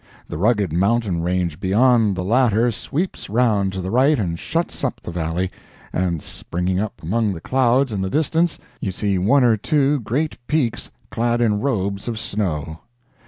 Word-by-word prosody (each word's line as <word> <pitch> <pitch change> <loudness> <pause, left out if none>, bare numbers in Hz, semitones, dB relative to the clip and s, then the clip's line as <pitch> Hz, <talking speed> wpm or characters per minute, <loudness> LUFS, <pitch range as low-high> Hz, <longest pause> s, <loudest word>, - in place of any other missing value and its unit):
The - - -5
rugged 105 -4 +2
mountain 100 -1 +1
range 90 -2 -1
beyond 110 +1 +3
the 90 - -3
latter 120 +2 +3
sweeps 155 - -4
round 105 -4 +2
to 95 - -3
the 95 +1 -4
right 135 +5 +4
and 85 -6 -2
shuts 170 +1 -2
up - - -1
the - - -7
valley, 85 +2 -2 0.4
and, 85 -4 -1
springing 90 +2 -2
up 105 -4 -4
among 105 +4 0
the 85 - -7
clouds 130 +5 +2
in 100 - -2
the 95 - -1
distance, 160 - +1 0.2
you 95 - -2
see 100 0 -1
one 125 +9 +4
or 120 -2 +5
two 140 +5 +1
great 140 +7 -2
peaks 125 -7 0 0.2
clad 120 +1 0
in 110 -4 +2
robes 100 -6 -2
of 115 -2 -2
snow. 80 -8 -3
105 Hz, 170 wpm, -21 LUFS, 95-125 Hz, 0.4 s, or